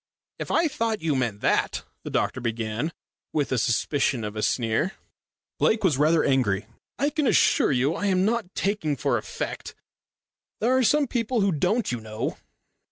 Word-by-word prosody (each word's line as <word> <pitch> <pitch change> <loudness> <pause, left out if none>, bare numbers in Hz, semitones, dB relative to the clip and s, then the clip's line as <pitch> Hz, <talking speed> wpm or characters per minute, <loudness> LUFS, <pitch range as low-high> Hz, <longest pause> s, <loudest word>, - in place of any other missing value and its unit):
"If - - -5
I 330 - +3
thought 225 - -2
you 155 -3 +1
meant 120 -6 -1
that - - +1
" - - -48
the - - -5
doctor 130 - -1
began, 115 +5 -2 0.4
with 150 -3 0
the 130 - +1
suspicion 120 +2 +1
of 105 0 -5
a 105 - -2
sneer. 115 - 0 0.7
Lake 220 -1 +2
was 155 -8 +2
rather 155 +2 +4
angry. 110 -7 +1 0.3
"I 285 +3 +1
can 300 -3 0
assure - - +4
you 135 +4 +2
I 205 - -2
am 185 -1 +2
not 220 -4 -1
talking 195 -7 0
for 125 - 0
effect. - - -6 0.8
There 245 +4 +2
are 260 - +4
some 295 +5 +3
people 235 -2 -1
who 195 -1 +3
don't, 210 - 0
you 120 -2 -3
know." 110 0 -4
155 Hz, 175 wpm, -25 LUFS, -, 0.8 s, rather